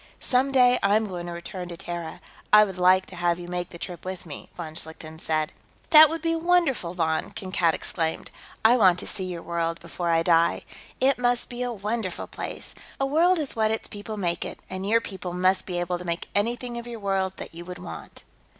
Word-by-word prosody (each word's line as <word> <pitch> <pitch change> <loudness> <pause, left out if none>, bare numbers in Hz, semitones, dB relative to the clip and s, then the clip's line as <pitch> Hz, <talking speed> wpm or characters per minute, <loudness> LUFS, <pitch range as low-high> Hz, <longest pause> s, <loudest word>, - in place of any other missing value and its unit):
"Some 265 +1 +2
day, 250 -2 +5
I 200 +1 +4
am 220 0 +2
going 175 -3 -5
to - - -5
return 175 +1 -6
to 170 - -7
Terra; 170 -2 -6 0.3
I 210 0 +9
would 190 -3 -4
like 185 +1 +5
to 185 - -11
have 175 -1 +1
you 175 -1 -8
make 175 0 -3
the 170 - -10
trip 175 0 -7
with 185 0 -6
me," 150 -4 -9
von 160 -3 -6
Schlichten 160 0 -6
said. 155 -2 -1 0.4
"That 310 -1 +10
would 325 +1 -4
be 330 0 +1
wonderful, 325 - +1
Von!" 160 -2 0
Kankad 185 -3 0
exclaimed. 160 -2 -2 0.3
"I 240 +3 +7
want 185 -6 +5
to - - -1
see 190 - -3
your 175 -2 -5
world, 165 -1 -2
before 170 +1 -4
I 165 0 +3
die. 170 -1 +3 0.4
It 265 0 +3
must 245 0 +1
be 245 0 -5
a 245 0 -1
wonderful 210 -2 -3
place. - - -6 0.3
A 270 - +2
world 335 +6 +4
is 300 -4 -2
what 220 -1 +2
its 220 0 -2
people 210 +1 -7
make 175 -3 0
it, - - -7
and 190 +1 -3
your 230 +1 +4
people 190 -4 -6
must 185 +1 +2
be 180 -2 -2
able 175 0 -1
to - - -7
make 170 -1 -3
anything 235 +3 -1
of 235 - -9
your 235 -1 -6
world 190 -2 -1
that - - -7
you 170 +1 -8
would 180 0 -7
want." 80 - -9
185 Hz, 225 wpm, -26 LUFS, 170-235 Hz, 0.4 s, That